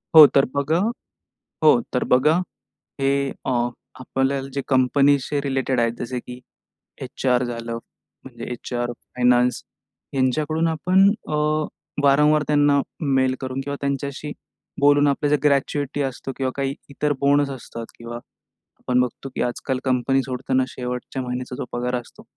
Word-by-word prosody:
हो 155 -1 +13
तर 135 - +6
बघा 140 +3 +1 0.9
हो 150 -6 +7
तर 125 - 0
बघा, 150 +6 +5 0.6
हे 140 0 +1 0.2
अ, - - +1 0.5
आपल्याला 135 +1 -1
जे 140 0 -2
कंपनीशी 140 +2 +3
रिलेटेड 135 -2 0
आहेत 115 -1 +2
जसे 125 +1 -3
की 125 +1 -10 0.6
एच-आर 125 -1 0
झालं, 115 -1 -4 0.5
म्हणजे 120 -3 -9
एच-आर 120 0 -3
फायनान्स 125 +1 +1 0.5
ह्यांच्याकडून 150 +5 +1
आपण 180 +5 +4 0.2
अ, 155 - -2 0.7
वारंवार 150 +2 +5
त्यांना 145 -1 +4 0.4
मेल 130 0 +2
करून 130 0 -3
किंवा 140 0 -3
त्यांच्याशी 140 +1 -3 0.5
बोलून 145 0 +5
आपल्या 145 +1 0
जे 150 - +5
ग्रॅच्युएटी 145 0 +1
असतो 135 0 -4
किंवा 130 -1 -1
काही 135 0 -1 0.2
इतर 145 +1 0
बोनस 140 0 +3
असतात 115 -3 -7
किंवा 120 0 -7 0.6
आपण 125 0 +1
बघतो 125 +2 -2
की - - -1
आजकाल 130 +2 -2
कंपनी 130 +1 +2
सोडताना 130 0 -1
शेवटच्या 125 +1 -5
महिन्याचा 125 0 -4
जो - - -4
पगार 125 +1 -2
असतो, 120 - -16
135 Hz, 135 wpm, -22 LUFS, 125-145 Hz, 0.9 s, हो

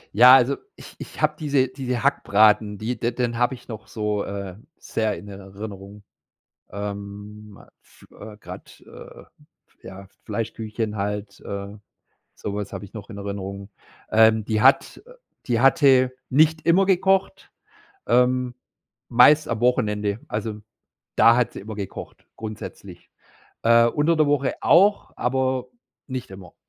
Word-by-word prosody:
Ja, 125 +3 +9
also, 135 +2 +3 0.2
ich - - -14
ich - - -10
habe 155 0 +2
diese 140 -3 +1
diese 125 -2 -4
Hackbraten, 105 -5 +3
die 120 +3 -3
de 120 +1 0
den 120 -1 -2
habe 125 +2 +1
ich 125 - -12
noch 110 -2 -9
so, 105 -2 -2
äh, 100 -2 -6 0.2
sehr 110 -2 -2
in 105 - -11
Erinnerung. 100 +1 -10 0.7
Ähm, 100 +1 -8
a - - -18
f - - -21
äh, 105 0 -11
grad, - - -12
äh, - - -13 0.6
ja, 95 +1 -10
F 95 - -20
Fleischküchchen 110 0 -4
halt, 100 0 -4
äh, 100 0 -6 0.7
so 100 - -6
was 105 -1 -5
habe - - -6
ich 100 - -15
noch 110 0 -9
in 100 - -8
Erinnerung. 100 0 -6 0.4
Ähm, 110 0 +4
die 110 0 -1
hat, 135 - +3
äh - - -15 0.3
die 120 -3 +1
hatte 135 -1 +4 0.2
nicht 155 +3 +2
immer 180 +4 +5
gekocht, 190 0 +1 0.6
ähm, 125 0 +2 0.5
meist 135 +6 +5
am 115 -2 -2
Wochenende. 105 -4 0
Also, 105 0 -4 0.6
da 115 +1 +6
hat 125 -1 +1
sie - - -8
immer 110 +2 -8
gekocht 100 -3 -8
grundsätzlich. 110 -1 -9 0.5
Äh, 115 0 +5
unter 150 +7 +1
der 155 -1 +3
Woche 145 -2 0
auch, 200 +5 +3
aber 130 0 -1 0.4
nicht 130 -3 -6
immer. 95 -2 -12
110 Hz, 145 wpm, -23 LUFS, 105-130 Hz, 0.7 s, Ja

